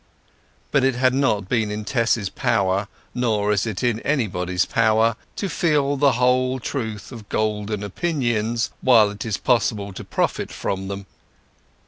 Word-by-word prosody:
But 140 Hz, -, +3 dB
it 135 Hz, -1 st, +2 dB
had 130 Hz, +1 st, +3 dB
not 130 Hz, -8 st, +1 dB
been 110 Hz, -1 st, +1 dB
in 105 Hz, 0 st, -4 dB
Tess's 115 Hz, -1 st, +1 dB
power—nor 105 Hz, +1 st, -1 dB
is 105 Hz, +2 st, +1 dB
it 110 Hz, -1 st, -4 dB
in 120 Hz, -3 st, +1 dB
anybody's 90 Hz, -10 st, 0 dB
power—to 110 Hz, -, +1 dB
feel 150 Hz, -5 st, +1 dB
the 140 Hz, -1 st, +3 dB
whole 125 Hz, +1 st, +2 dB
truth 110 Hz, -5 st, -4 dB
of 115 Hz, -5 st, -10 dB
golden 105 Hz, -1 st, -1 dB
opinions 120 Hz, -, -1 dB
while 115 Hz, -5 st, +5 dB
it 105 Hz, -, -7 dB
is 110 Hz, -3 st, -1 dB
possible 105 Hz, -5 st, 0 dB
to -, -, -7 dB
profit -, -, -1 dB
by -, -, +1 dB
them. 100 Hz, +1 st, -6 dB
110 Hz, 140 wpm, -22 LUFS, 105-125 Hz, -, while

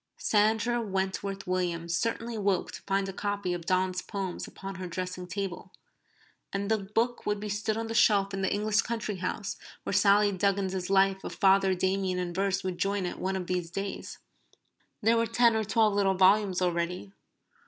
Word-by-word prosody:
Sandra 220 Hz, +3 st, +2 dB
Wentworth 195 Hz, -1 st, -3 dB
Williams 170 Hz, -2 st, -1 dB
certainly 230 Hz, +4 st, -2 dB
woke 200 Hz, -3 st, 0 dB
to -, -, -9 dB
find 195 Hz, 0 st, +1 dB
a 195 Hz, -, -5 dB
copy 200 Hz, -2 st, -2 dB
of 170 Hz, -1 st, -6 dB
Donne's 185 Hz, 0 st, +1 dB
poems 195 Hz, -4 st, -4 dB
upon 195 Hz, 0 st, -8 dB
her 180 Hz, -, -4 dB
dressing 180 Hz, +1 st, -5 dB
table. 190 Hz, 0 st, -5 dB, 0.8 s
And 200 Hz, +2 st, -2 dB
the 220 Hz, -, +3 dB
book 225 Hz, +5 st, -1 dB
would 210 Hz, 0 st, 0 dB
be 210 Hz, +1 st, -5 dB
stood 210 Hz, +2 st, -1 dB
on 225 Hz, -, -2 dB
the 225 Hz, -, -4 dB
shelf 200 Hz, -4 st, +4 dB
in 195 Hz, -, -2 dB
the 190 Hz, -, 0 dB
English 210 Hz, +1 st, +2 dB
country 225 Hz, -4 st, -3 dB
house 195 Hz, +2 st, -3 dB, 0.3 s
where -, -, -3 dB
Sally 200 Hz, +1 st, +5 dB
Duggan's 190 Hz, -1 st, 0 dB
Life 195 Hz, 0 st, +3 dB
of -, -, -6 dB
Father 195 Hz, -1 st, +4 dB
Damien 190 Hz, 0 st, 0 dB
in 180 Hz, -1 st, -2 dB
verse 195 Hz, +1 st, 0 dB
would 185 Hz, -2 st, -3 dB
join 200 Hz, -1 st, 0 dB
it 180 Hz, -, -5 dB
one 190 Hz, +1 st, -1 dB
of 185 Hz, -1 st, -3 dB
these 180 Hz, -2 st, -2 dB
days. 195 Hz, +3 st, -5 dB, 0.9 s
There 230 Hz, +2 st, +4 dB
were 230 Hz, 0 st, +2 dB
ten 235 Hz, -1 st, +4 dB
or 220 Hz, -, +1 dB
twelve 215 Hz, +1 st, +2 dB
little 195 Hz, -1 st, +2 dB
volumes 190 Hz, 0 st, +4 dB
already. 180 Hz, +2 st, -2 dB
195 Hz, 185 wpm, -29 LUFS, 185-210 Hz, 0.9 s, Sally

